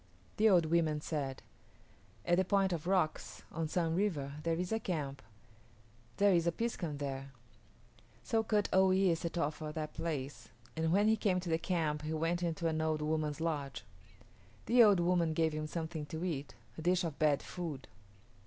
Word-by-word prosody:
The 220 Hz, +1 st, +5 dB
old 175 Hz, -5 st, +5 dB
women 160 Hz, -2 st, +2 dB
said, 140 Hz, -4 st, -4 dB, 0.8 s
"At 175 Hz, 0 st, +3 dB
the 185 Hz, -, +4 dB
Point 195 Hz, 0 st, +2 dB
of 170 Hz, 0 st, -4 dB
Rocks 180 Hz, -5 st, 0 dB
on 165 Hz, -1 st, -2 dB
Sun 165 Hz, 0 st, 0 dB
River 165 Hz, -8 st, -1 dB
there 165 Hz, +1 st, 0 dB
is 180 Hz, +1 st, -3 dB
a 225 Hz, -, +1 dB
camp. 145 Hz, -9 st, -3 dB, 1.0 s
There 200 Hz, -1 st, +5 dB
is 170 Hz, -1 st, +2 dB
a -, -, +4 dB
piskun 170 Hz, -8 st, -3 dB
there." 135 Hz, -1 st, -5 dB, 0.9 s
So 225 Hz, -, +1 dB
Kut 210 Hz, -2 st, +1 dB
o 190 Hz, 0 st, +6 dB
yis´ 185 Hz, -2 st, +3 dB
set 170 Hz, +1 st, -4 dB
off 150 Hz, -2 st, 0 dB
for 155 Hz, -1 st, -5 dB
that 155 Hz, -1 st, -4 dB
place, 145 Hz, -4 st, -4 dB, 0.3 s
and 160 Hz, 0 st, 0 dB
when 205 Hz, +4 st, +4 dB
he 220 Hz, -, +5 dB
came 190 Hz, -4 st, +1 dB
to 175 Hz, -, -5 dB
the 160 Hz, -, +2 dB
camp 160 Hz, -4 st, -1 dB
he 155 Hz, +1 st, -3 dB
went 165 Hz, +2 st, 0 dB
into 170 Hz, -1 st, -1 dB
an 160 Hz, -1 st, 0 dB
old 155 Hz, -1 st, 0 dB
woman's 155 Hz, -1 st, -1 dB
lodge. 150 Hz, -4 st, -3 dB, 0.8 s
The 245 Hz, +1 st, +5 dB
old 205 Hz, -4 st, +6 dB
woman 170 Hz, -2 st, +2 dB
gave 160 Hz, 0 st, +1 dB
him 155 Hz, 0 st, -3 dB
something 160 Hz, -2 st, -4 dB
to 160 Hz, +4 st, -4 dB
eat 145 Hz, -5 st, -4 dB, 0.2 s
a -, -, -4 dB
dish 180 Hz, +2 st, +2 dB
of 160 Hz, -4 st, -4 dB
bad 150 Hz, -2 st, +3 dB
food. 160 Hz, -7 st, -6 dB
165 Hz, 185 wpm, -33 LUFS, 155-180 Hz, 1.0 s, o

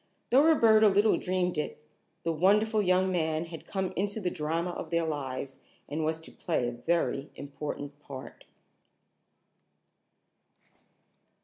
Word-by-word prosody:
Though 260 Hz, +3 st, +7 dB
Roberta 225 Hz, -9 st, +6 dB
little 205 Hz, +2 st, +4 dB
dreamed 180 Hz, -3 st, 0 dB
it, 150 Hz, -, -3 dB, 0.5 s
the 165 Hz, -, 0 dB
wonderful 210 Hz, +6 st, +3 dB
young 185 Hz, 0 st, +2 dB
man 160 Hz, -2 st, 0 dB
had 165 Hz, -1 st, -10 dB
come 190 Hz, -2 st, -2 dB
into 205 Hz, +3 st, -1 dB
the 180 Hz, -4 st, -1 dB
drama 165 Hz, +3 st, -2 dB
of 165 Hz, -, -6 dB
their 170 Hz, 0 st, +1 dB
lives, 135 Hz, -3 st, -4 dB, 0.3 s
and 155 Hz, +2 st, -3 dB
was 160 Hz, +1 st, 0 dB
to -, -, -13 dB
play 155 Hz, -8 st, -1 dB
a -, -, -2 dB
very 140 Hz, +3 st, -1 dB
important 145 Hz, 0 st, -6 dB
part. 135 Hz, -3 st, -10 dB
170 Hz, 130 wpm, -29 LUFS, 150-195 Hz, 0.5 s, Though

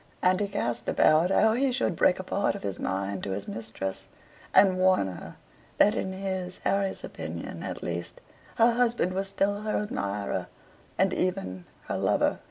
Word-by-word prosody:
And 185 Hz, 0 st, +4 dB
he 205 Hz, -, 0 dB
cast 120 Hz, -11 st, -2 dB
about 155 Hz, +3 st, +4 dB
how 220 Hz, +3 st, +4 dB
he 265 Hz, +3 st, +2 dB
should 245 Hz, -8 st, 0 dB
break 180 Hz, -, +4 dB
a 185 Hz, -, -5 dB
part 200 Hz, +2 st, 0 dB
of -, -, -8 dB
his 100 Hz, -2 st, -4 dB
mind 95 Hz, 0 st, -2 dB
to 95 Hz, -, -2 dB
his 100 Hz, +1 st, -5 dB
mistress, 105 Hz, -3 st, -4 dB, 0.4 s
and 190 Hz, -2 st, +5 dB
warn 185 Hz, -, +4 dB
her 95 Hz, -2 st, -7 dB, 0.4 s
that 210 Hz, -, +5 dB
in 190 Hz, -, -2 dB
his, 190 Hz, -1 st, -4 dB
Harry's 195 Hz, -1 st, 0 dB
opinion, 80 Hz, +1 st, -6 dB
at -, -, -5 dB
least, 85 Hz, 0 st, -4 dB, 0.4 s
her 230 Hz, +1 st, +5 dB
husband 235 Hz, -6 st, +1 dB
was 195 Hz, +1 st, -1 dB
still 200 Hz, +1 st, 0 dB
her 215 Hz, 0 st, -1 dB
admirer, 100 Hz, -, -2 dB, 0.5 s
and 190 Hz, 0 st, +3 dB
even 180 Hz, -, -2 dB, 0.2 s
her -, -, -2 dB
lover. -, -, +2 dB
185 Hz, 175 wpm, -27 LUFS, -, 0.5 s, and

